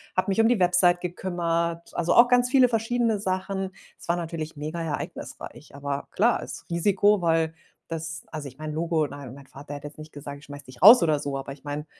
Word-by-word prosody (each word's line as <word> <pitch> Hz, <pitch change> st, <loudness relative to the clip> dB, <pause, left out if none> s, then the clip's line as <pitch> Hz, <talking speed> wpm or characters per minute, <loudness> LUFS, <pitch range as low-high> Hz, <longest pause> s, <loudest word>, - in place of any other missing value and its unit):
habe 185 Hz, -, +1 dB
mich 195 Hz, +3 st, 0 dB
um 225 Hz, -, +4 dB
die 240 Hz, -3 st, +2 dB
Website 180 Hz, 0 st, +4 dB
gekümmert, 170 Hz, -2 st, -2 dB
also, 175 Hz, 0 st, +1 dB
auch 240 Hz, +1 st, +7 dB
ganz 245 Hz, 0 st, +3 dB
viele 255 Hz, -1 st, +5 dB
verschiedene 230 Hz, -1 st, 0 dB
Sachen. 190 Hz, 0 st, -2 dB, 0.3 s
Es -, -, -13 dB
war 170 Hz, -, +2 dB
natürlich 160 Hz, -2 st, -5 dB
mega 155 Hz, +3 st, -5 dB
ereignisreich, 160 Hz, -3 st, -6 dB
aber 140 Hz, 0 st, -4 dB
klar 230 Hz, +4 st, +2 dB
ist -, -, -8 dB
Risiko, 200 Hz, +4 st, +3 dB
weil 165 Hz, -1 st, +1 dB, 0.3 s
das 160 Hz, 0 st, -5 dB
also, 155 Hz, -3 st, -6 dB
ich 130 Hz, -1 st, -12 dB
meine 155 Hz, 0 st, -5 dB
Logo, 160 Hz, -1 st, 0 dB
mein 140 Hz, -3 st, -9 dB
mein 140 Hz, 0 st, -13 dB
Vater 140 Hz, +3 st, -10 dB
hätte 145 Hz, 0 st, -7 dB
jetzt 145 Hz, -, -13 dB
nicht 155 Hz, 0 st, -11 dB
gesagt: 145 Hz, 0 st, -8 dB
„Ich 145 Hz, -, -16 dB
schmeiße 145 Hz, 0 st, -10 dB
dich 130 Hz, -1 st, -14 dB
raus 220 Hz, +4 st, +10 dB
oder 155 Hz, -3 st, +2 dB
so“, 140 Hz, -1 st, -3 dB
aber 135 Hz, 0 st, -6 dB
ich 140 Hz, -, -18 dB
meine, 145 Hz, +1 st, -4 dB
165 Hz, 215 wpm, -25 LUFS, 145-190 Hz, 0.3 s, raus